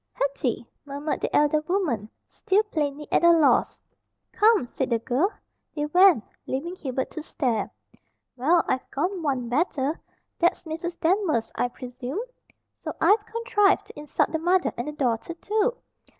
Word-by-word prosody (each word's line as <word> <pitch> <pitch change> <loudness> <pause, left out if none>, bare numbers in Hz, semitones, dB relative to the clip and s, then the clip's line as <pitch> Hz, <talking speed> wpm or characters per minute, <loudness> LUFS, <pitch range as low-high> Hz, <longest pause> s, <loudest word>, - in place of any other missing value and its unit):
"Hetty!" 270 -4 -1 0.2
murmured 285 +2 -4
the - - -1
elder 295 +1 +3
woman, 300 - -1 0.2
still 400 +3 +1
plainly 300 -7 -3
at - - +3
a 340 - +8
loss. 320 -4 +3 0.5
"Come!" 430 - +4
said 265 - -1
the 235 - +2
girl. 260 - 0 0.4
They 295 -1 -1
went, 355 - +5 0.2
leaving 330 +7 -3
Hubert 265 -6 -3
to 315 - -6
stare. 245 -8 -1 0.7
"Well 320 +7 +3
I've 260 - -1
gone 360 +6 -2
one 265 -6 -1
better! 285 +2 0 0.4
That's 345 0 +2
Mrs. 335 +1 -5
Danvers, 325 - +1
I - - 0
presume. 250 - -6 0.5
So - - -6
I've 415 +1 +4
contrived 450 -4 +2
to - - -12
insult 295 0 0
the 320 - -1
mother 355 +2 +2
and 240 - -4
the - - -2
daughter 260 +3 -1
too. 435 +7 0
305 Hz, 150 wpm, -25 LUFS, 265-365 Hz, 0.7 s, a